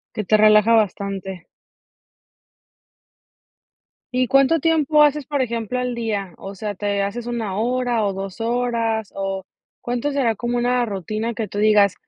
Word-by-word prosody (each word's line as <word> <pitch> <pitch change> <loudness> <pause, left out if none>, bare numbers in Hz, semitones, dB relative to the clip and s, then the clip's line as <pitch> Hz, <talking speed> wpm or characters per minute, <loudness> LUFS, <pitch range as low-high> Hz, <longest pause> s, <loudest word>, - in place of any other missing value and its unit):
Que 215 - -2
te 215 - +4
relaja 215 +1 +5
bastante. 195 -4 -1 2.7
¿Y 255 -2 +1
cuánto 275 +4 +4
tiempo 305 -1 +3
haces, 295 -1 +3
por 285 -1 -2
ejemplo, 235 0 -2
al 250 -1 -2
día? 210 -6 -3
O 195 +1 -8
sea, 205 +1 -4
¿te 200 +1 -2
haces 230 +4 -4
1 225 -5 -3
hora 240 0 0
o 200 - 0
2 195 +3 -6
horas, 230 -2 -1
o 195 -1 -3 0.3
cuánto 245 +4 -2
será 245 -5 +1
como 240 +3 -2
una 245 0 +1
rutina, 215 +3 -3
que 220 -3 -4
tú 205 - -9
digas 210 -2 +4
225 Hz, 150 wpm, -21 LUFS, 200-245 Hz, 2.7 s, relaja